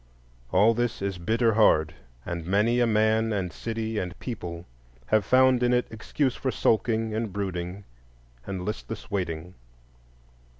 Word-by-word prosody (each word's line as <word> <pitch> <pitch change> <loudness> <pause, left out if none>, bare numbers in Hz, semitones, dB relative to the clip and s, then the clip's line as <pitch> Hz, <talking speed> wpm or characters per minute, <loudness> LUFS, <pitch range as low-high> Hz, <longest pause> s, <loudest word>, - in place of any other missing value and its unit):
All 110 +3 +5
this 120 0 -1
is 100 -3 -2
bitter 115 +5 +2
hard; 80 -8 +4 0.3
and 85 -1 -4
many 105 +7 +2
a 120 - +3
man 110 +1 +2
and 95 -4 -2
city 110 -1 -3
and 90 +1 -5
people 90 -8 -6 0.4
have 110 - +2
found 130 +3 +4
in 125 0 +3
it 125 0 +2
excuse 125 +4 -1
for 135 - -2
sulking, 110 -2 +1
and 110 -1 -2
brooding, 95 -1 -4 0.6
and 95 -2 -4
listless 110 +1 -6
waiting. 90 -3 -3
110 Hz, 140 wpm, -26 LUFS, 90-115 Hz, 0.6 s, All